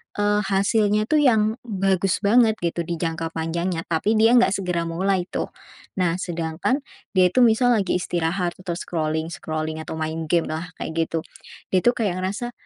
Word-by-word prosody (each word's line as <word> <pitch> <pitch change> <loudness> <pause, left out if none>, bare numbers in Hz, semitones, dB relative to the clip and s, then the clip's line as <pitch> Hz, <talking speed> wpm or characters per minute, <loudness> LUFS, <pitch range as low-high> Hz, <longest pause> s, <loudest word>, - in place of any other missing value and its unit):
eee, 205 0 +2
hasilnya 205 +2 +2
tuh 300 +7 +2
yang 220 -4 +3
bagus 195 -1 0
banget 220 +1 +4
gitu, 170 0 -1
di 170 - -2
jangka 165 0 -2
panjangnya, 165 +1 -2
tapi 170 +7 0
dia 225 +2 +5
nggak 220 - +3
segera 180 -3 -2
mulai 185 +2 0
tuh. - - -3 0.5
Nah, 175 -2 +2
sedangkan 170 - -2 0.3
dia 185 -2 +5
itu 250 - +4
misal 240 +2 +4
lagi 195 -4 0
istirahat, 175 +1 -1
atau 180 -2 -5
scrolling-scrolling, 160 -1 -3
atau 160 - -6
main 160 0 -3
gamelah, 165 0 -1
kayak - - -4 0.2
gitu. 165 - -2 0.5
Dia 185 - +4
tuh 240 - +5
kayak 190 -6 -1
ngerasa, 215 +6 -3
180 Hz, 160 wpm, -23 LUFS, 165-210 Hz, 0.5 s, dia